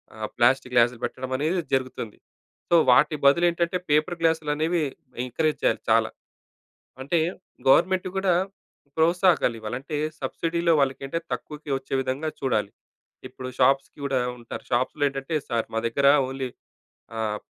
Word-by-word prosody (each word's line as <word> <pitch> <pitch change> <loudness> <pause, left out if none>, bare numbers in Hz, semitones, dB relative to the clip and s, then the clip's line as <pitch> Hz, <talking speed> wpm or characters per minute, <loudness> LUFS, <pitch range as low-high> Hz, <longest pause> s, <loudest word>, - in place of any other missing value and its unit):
ఆహ్, 110 -1 -5
ప్లాస్టిక్ 125 +1 +3
గ్లాసులు 120 0 +4
పెట్టడమనేది 130 +7 -2
జరుగుతుంది. 130 -4 -2 0.5
సో, 175 - +5 0.2
వాటి 150 +5 +4
బదులు 155 +5 +5
ఏంటంటే, 170 +1 0
పేపర్ 155 +4 +2
గ్లాసులనేవి 160 +1 +1 0.4
ఎంకరేజ్ 155 +5 -1
చేయాలి - - +1
చాలా. - - +4 0.9
అంటే, 165 +5 +1 0.5
గవర్నమెంట్ 185 +6 +4
కూడా 190 -1 +2 0.6
ప్రోత్సాహాగాలివ్వాలి, 160 - +2
అంటే 150 +2 -5 0.2
సబ్సిడీలో 165 +5 0
వాళ్ళకి 135 0 0
అంటే 165 +5 -2
తక్కువకి 150 -1 -6
వచ్చే 135 0 -5
విధంగా 135 +4 -2
చూడాలి. 110 -7 0 0.6
ఇప్పుడు 130 0 -8
షాప్స్‌కి 135 +3 +2
కూడా 135 -2 +1 0.2
ఉంటారు. 120 -1 -8
షాప్స్‌లో 130 +4 0
ఏంటంటే, 135 +3 -4
సార్, 115 -1 -1
మా - - +1
దగ్గర 140 +4 +1 0.2
ఓన్లీ 135 -1 -4 0.7
ఆహ్, 105 -1 -1
140 Hz, 125 wpm, -25 LUFS, 125-165 Hz, 0.9 s, సో